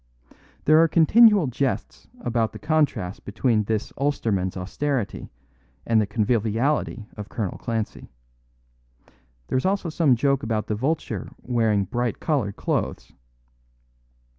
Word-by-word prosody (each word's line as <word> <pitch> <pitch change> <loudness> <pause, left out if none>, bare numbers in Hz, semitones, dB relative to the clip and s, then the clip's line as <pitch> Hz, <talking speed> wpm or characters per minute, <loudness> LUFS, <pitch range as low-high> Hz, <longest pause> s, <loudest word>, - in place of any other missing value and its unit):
There 155 +1 +6
are 165 - +5
continual 205 +4 +6
jests 125 - -3
about 115 -2 0
the - - -7
contrast 145 - 0
between 105 +1 0
this 110 0 -2
Ulsterman's 105 -10 0
austerity 120 +5 -3 0.6
and 115 -1 +3
the 105 - -1
conviviality 115 +3 0
of 105 -1 -8
Colonel 105 -7 -4
Clancy. 115 -3 -4 1.4
There 130 - +2
is - - -5
also 195 -3 0
some 155 -5 +3
joke 140 +2 +1
about 110 -4 -1
the - - -2
Vulture 145 +9 -2
wearing 110 -5 +1
bright 120 +4 -2
coloured 130 -11 -1
clothes. - - -2
120 Hz, 120 wpm, -24 LUFS, 105-145 Hz, 1.4 s, There